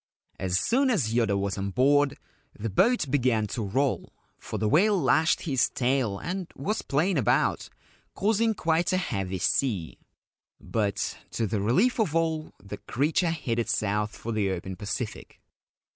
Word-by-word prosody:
As 95 Hz, 0 st, +1 dB
soon 265 Hz, +3 st, +2 dB
as 135 Hz, -, +1 dB
Yoda 115 Hz, -4 st, +2 dB
was 100 Hz, 0 st, -2 dB
on 100 Hz, +1 st, -2 dB
board, 140 Hz, +6 st, +3 dB, 0.4 s
the 110 Hz, 0 st, -4 dB
boat 200 Hz, -, +2 dB
began 125 Hz, -6 st, +2 dB
to 110 Hz, +3 st, -4 dB
roll, 130 Hz, +7 st, -1 dB, 0.3 s
for -, -, -5 dB
the 110 Hz, -, 0 dB
whale 195 Hz, -, +4 dB
lashed 160 Hz, +2 st, +3 dB
his 135 Hz, -6 st, +1 dB
tail 125 Hz, -5 st, 0 dB
and 180 Hz, -, -4 dB
was 205 Hz, +11 st, -2 dB
playing 160 Hz, +4 st, +1 dB
about, 115 Hz, -, +1 dB, 0.5 s
causing 220 Hz, +2 st, +1 dB
quite 165 Hz, -2 st, +1 dB
a 185 Hz, -, +2 dB
heavy 95 Hz, -, -2 dB
sea; 95 Hz, -, -1 dB, 0.6 s
but, 105 Hz, -3 st, -2 dB
to 115 Hz, -, -2 dB
the 105 Hz, -1 st, -1 dB
relief 190 Hz, -, +2 dB
of 170 Hz, -8 st, +1 dB
all, 160 Hz, -1 st, 0 dB
the 100 Hz, +1 st, -8 dB
creature 155 Hz, -, 0 dB
headed 120 Hz, -8 st, -2 dB
south 105 Hz, 0 st, 0 dB
for 115 Hz, -, -5 dB
the 105 Hz, -3 st, 0 dB
open 95 Hz, 0 st, -4 dB
Pacific. 105 Hz, +4 st, -5 dB
130 Hz, 155 wpm, -27 LUFS, 105-165 Hz, 0.6 s, whale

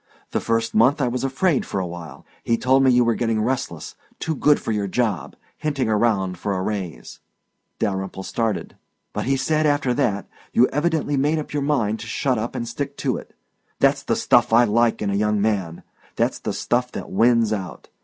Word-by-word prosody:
The -, -, 0 dB
first 115 Hz, 0 st, -1 dB
month 125 Hz, +7 st, +4 dB
I 135 Hz, -, +1 dB
was 125 Hz, +2 st, -2 dB
afraid 135 Hz, +3 st, +1 dB
for 100 Hz, -, -3 dB
awhile. 85 Hz, -6 st, -7 dB, 0.2 s
He 115 Hz, -, +1 dB
told 130 Hz, +3 st, +3 dB
me 135 Hz, -, +5 dB
you 125 Hz, -1 st, +5 dB
were 115 Hz, -, +3 dB
getting 115 Hz, -1 st, 0 dB
restless, 110 Hz, -, -2 dB, 0.3 s
too 160 Hz, -, -1 dB
good 150 Hz, 0 st, +3 dB
for -, -, -3 dB
your 105 Hz, -2 st, -1 dB
job, 115 Hz, +2 st, -1 dB, 0.2 s
hinting 140 Hz, -6 st, -1 dB
around 105 Hz, -5 st, +1 dB
for 100 Hz, -, -2 dB
a 95 Hz, -, -2 dB
raise 95 Hz, -5 st, -5 dB, 0.3 s
" -, -, -52 dB
Dalyrimple 95 Hz, -1 st, -2 dB
started. 115 Hz, -2 st, -2 dB, 0.2 s
" -, -, -52 dB
But -, -, -2 dB
he 135 Hz, +2 st, +1 dB
said 155 Hz, +3 st, +1 dB
after 145 Hz, -3 st, +1 dB
that 100 Hz, -4 st, 0 dB, 0.3 s
you 120 Hz, -, +6 dB
evidently 150 Hz, -1 st, 0 dB
made 145 Hz, +4 st, +2 dB
up 155 Hz, -, -5 dB
your 145 Hz, -, 0 dB
mind 115 Hz, -7 st, 0 dB
to -, -, -8 dB
shut 130 Hz, -5 st, 0 dB
up 115 Hz, +3 st, -4 dB
and 120 Hz, -, -3 dB
stick 140 Hz, +4 st, -4 dB
to -, -, -1 dB
it. -, -, -12 dB, 0.4 s
That's -, -, +3 dB
the -, -, 0 dB
stuff 120 Hz, -1 st, +3 dB
I 120 Hz, +2 st, +6 dB
like 115 Hz, 0 st, +2 dB
in 100 Hz, -, 0 dB
a -, -, 0 dB
young 105 Hz, +1 st, +1 dB
man! 100 Hz, -6 st, -1 dB, 0.3 s
That's -, -, 0 dB
the -, -, -3 dB
stuff 125 Hz, +1 st, 0 dB
that -, -, -6 dB
wins 115 Hz, +1 st, +3 dB
out. 95 Hz, -4 st, -6 dB
115 Hz, 205 wpm, -22 LUFS, 105-135 Hz, 0.4 s, you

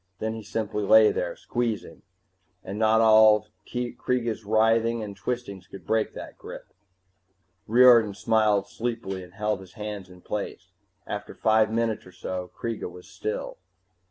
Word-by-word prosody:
Then 110 Hz, +2 st, -3 dB
he 110 Hz, -, -6 dB
simply 110 Hz, 0 st, -3 dB
lay 110 Hz, +2 st, +7 dB
there, 85 Hz, -1 st, -3 dB
squeezing, 120 Hz, -3 st, -3 dB, 0.6 s
and 100 Hz, +3 st, -6 dB
not 110 Hz, 0 st, +4 dB
all 110 Hz, -1 st, +6 dB, 0.2 s
Kreega's 120 Hz, -1 st, -2 dB
writhing 115 Hz, +2 st, +2 dB
and 100 Hz, -2 st, -7 dB
twistings 100 Hz, -2 st, -5 dB
could 95 Hz, -4 st, -12 dB
break 110 Hz, +4 st, 0 dB
that -, -, -9 dB
grip. -, -, -10 dB, 0.9 s
Riordan 115 Hz, -3 st, +6 dB
smiled 105 Hz, 0 st, +2 dB
sleepily 115 Hz, -5 st, -4 dB
and 90 Hz, 0 st, -14 dB
held 105 Hz, -1 st, -1 dB
his 95 Hz, -1 st, -14 dB
hands 105 Hz, -4 st, -6 dB
in 90 Hz, 0 st, -15 dB
place. 100 Hz, -2 st, -5 dB, 0.3 s
After 105 Hz, 0 st, -6 dB
five 110 Hz, -1 st, +3 dB
minutes 115 Hz, -3 st, -1 dB
or -, -, -13 dB
so 90 Hz, 0 st, -5 dB
Kreega 115 Hz, -5 st, -4 dB
was 90 Hz, 0 st, -13 dB
still. -, -, -5 dB
110 Hz, 145 wpm, -26 LUFS, 100-115 Hz, 0.9 s, lay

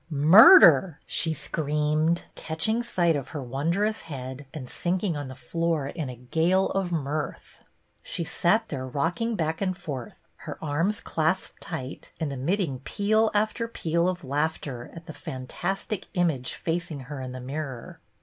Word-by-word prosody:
"Murder!" 165 Hz, -, +8 dB
she 165 Hz, -, 0 dB
screamed, 155 Hz, +2 st, 0 dB
catching 165 Hz, +9 st, -1 dB
sight 175 Hz, -8 st, +1 dB
of 140 Hz, -3 st, -3 dB
her 145 Hz, -3 st, -5 dB
wondrous 170 Hz, -, 0 dB
head, 130 Hz, -2 st, -7 dB
and 145 Hz, -6 st, -7 dB
sinking 180 Hz, +4 st, -1 dB
on 145 Hz, -1 st, -4 dB
the 130 Hz, -, -8 dB
floor 155 Hz, +3 st, -1 dB
in 155 Hz, -5 st, -4 dB
a 125 Hz, -, -7 dB
gale 165 Hz, +10 st, +1 dB
of 195 Hz, -2 st, -1 dB
mirth. 150 Hz, -2 st, -4 dB, 0.4 s
She 170 Hz, -, -3 dB
sat 215 Hz, +7 st, +1 dB
there 130 Hz, -3 st, -4 dB
rocking 175 Hz, -, -1 dB
back 160 Hz, -2 st, -2 dB
and 185 Hz, -2 st, -1 dB
forth, 130 Hz, -10 st, -6 dB, 0.2 s
her -, -, -8 dB
arms 165 Hz, +8 st, -1 dB
clasped 160 Hz, +4 st, -1 dB
tight, 140 Hz, -6 st, -7 dB
and 155 Hz, -4 st, -2 dB
emitting 140 Hz, +1 st, -1 dB
peal 215 Hz, -, +1 dB
after 215 Hz, +2 st, +1 dB
peal 170 Hz, -5 st, 0 dB
of 180 Hz, -1 st, -4 dB
laughter 140 Hz, -3 st, -2 dB
at 165 Hz, 0 st, -10 dB
the 160 Hz, -, -8 dB
fantastic 175 Hz, +12 st, -4 dB
image 160 Hz, -8 st, 0 dB
facing 165 Hz, -3 st, -3 dB
her 135 Hz, +1 st, -7 dB
in 130 Hz, -1 st, -5 dB
the 130 Hz, -, -7 dB
mirror. 135 Hz, -1 st, -6 dB
160 Hz, 150 wpm, -26 LUFS, 140-180 Hz, 0.4 s, Murder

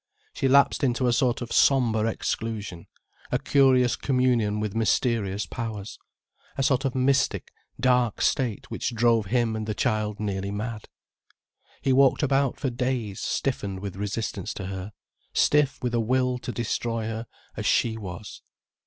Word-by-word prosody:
She -, -, 0 dB
lapsed 140 Hz, +2 st, +4 dB
into 125 Hz, -1 st, +1 dB
a 120 Hz, -, +3 dB
sort 125 Hz, -1 st, +1 dB
of 115 Hz, -, -9 dB
sombre 115 Hz, -5 st, +3 dB
exclusion, 110 Hz, -6 st, -4 dB, 0.4 s
a -, -, +3 dB
curious 130 Hz, -3 st, +3 dB
communion 125 Hz, -6 st, +1 dB
with 105 Hz, -2 st, -2 dB
mysterious 110 Hz, -3 st, 0 dB
powers, 110 Hz, -4 st, -6 dB, 0.6 s
a 135 Hz, -, +1 dB
sort 135 Hz, 0 st, +2 dB
of 130 Hz, -, -1 dB
mystic, 135 Hz, +1 st, +1 dB, 0.3 s
dark 125 Hz, -3 st, +2 dB
state 125 Hz, -7 st, 0 dB
which 120 Hz, -, -3 dB
drove 115 Hz, -2 st, +3 dB
him 115 Hz, 0 st, +1 dB
and 110 Hz, 0 st, -4 dB
the 110 Hz, -, -2 dB
child 110 Hz, -4 st, -1 dB
nearly 100 Hz, -2 st, -2 dB
mad. 105 Hz, +2 st, -5 dB, 0.9 s
He 135 Hz, -, +3 dB
walked 135 Hz, +2 st, +4 dB
about 140 Hz, -1 st, +1 dB
for 135 Hz, -3 st, -1 dB
days 120 Hz, -5 st, -2 dB
stiffened 100 Hz, -8 st, -2 dB
with 100 Hz, -2 st, -5 dB
resistance 105 Hz, +2 st, -3 dB
to 95 Hz, -, -5 dB
her, 95 Hz, +1 st, -6 dB, 0.4 s
stiff 145 Hz, -2 st, +3 dB
with 125 Hz, -1 st, -1 dB
a 120 Hz, -, +2 dB
will 125 Hz, +2 st, +1 dB
to 125 Hz, -, -5 dB
destroy 115 Hz, -1 st, -2 dB
her 115 Hz, +1 st, -4 dB, 0.3 s
as -, -, -2 dB
she 115 Hz, -1 st, +2 dB
was. 100 Hz, -2 st, -8 dB
115 Hz, 155 wpm, -26 LUFS, 105-130 Hz, 0.9 s, lapsed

